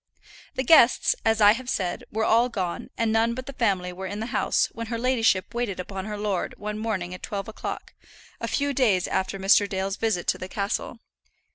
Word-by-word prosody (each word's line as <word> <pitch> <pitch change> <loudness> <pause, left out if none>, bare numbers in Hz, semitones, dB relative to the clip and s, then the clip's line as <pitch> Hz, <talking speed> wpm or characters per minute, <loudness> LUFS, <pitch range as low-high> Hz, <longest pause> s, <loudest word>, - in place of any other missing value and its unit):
The 260 - 0
guests, 265 -3 +5
as 225 0 +2
I 205 0 +8
have 250 +3 -3
said, 180 -7 -2
were 220 +1 0
all 235 +2 +4
gone, 185 -7 -4
and 230 -1 +1
none 225 +1 +2
but 255 +1 -6
the 275 - -7
family 190 -7 0
were 190 +1 -6
in 205 +2 -5
the 220 - -3
house - - +2
when 230 +1 -6
her 230 0 -3
ladyship 230 -6 +1
waited 235 -6 -2
upon 190 +1 -5
her 210 -1 -5
lord 205 -3 -2
one 210 +1 -5
morning 195 -5 -2
at 180 - -9
twelve 200 -1 -4
o'clock, 220 - -6 0.5
a - - -3
few 285 0 0
days 215 -9 +2
after 190 +1 -1
Mr. 195 +1 +4
Dale's 195 0 -2
visit 220 -6 0
to - - +1
the 185 - -6
castle. 200 +4 -3
210 Hz, 210 wpm, -25 LUFS, 190-230 Hz, 0.5 s, I